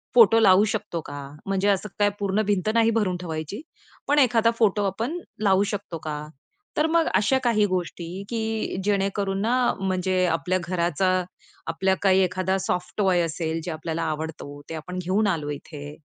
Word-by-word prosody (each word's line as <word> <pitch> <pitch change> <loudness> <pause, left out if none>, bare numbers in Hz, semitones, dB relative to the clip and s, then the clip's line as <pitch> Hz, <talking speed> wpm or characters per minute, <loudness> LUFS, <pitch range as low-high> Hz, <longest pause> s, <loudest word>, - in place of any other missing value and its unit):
Photo 225 -1 +7
लावू 195 -1 +6
शकतो 170 -4 -3
का? 145 - -7 0.3
म्हणजे 195 +1 0
असं 200 +1 0
काय 205 0 +4
पूर्ण 200 +1 +1
भिंत 205 0 +1
नाही 230 -1 +4
भरून 205 -5 0
ठेवायची. 165 - -5 0.5
पण 290 +1 +4
एखादा 230 -3 +4
फोटो 205 -2 +3
आपण 230 - -2 0.2
लावू 195 0 +4
शकतो 195 -4 -4
का? 150 -1 -5 0.5
तर 305 +1 +3
मग 330 0 +3
अशा 265 +6 +3
काही 215 -3 +3
गोष्टी 180 0 -4
की 225 -3 -2
जेणेकरून 195 -1 0
ना, 245 +3 +2
म्हणजे 185 -1 +1
आपल्या 180 +2 0
घराचा 175 0 0 0.6
आपला 190 +3 +1
काही 190 -1 +5
एखादा 185 +1 0
सॉफ्ट 180 -1 -2
टॉय 190 -4 +3
असेल, 165 0 -2
जे 175 - -4
आपल्याला 160 +1 -3
आवडतो, 155 -2 -5
ते - - -5
आपण 180 +4 -6
घेऊन 195 +4 +1
आलो 160 -6 -1
इथे. 145 0 -8
190 Hz, 165 wpm, -25 LUFS, 170-210 Hz, 0.6 s, फोटो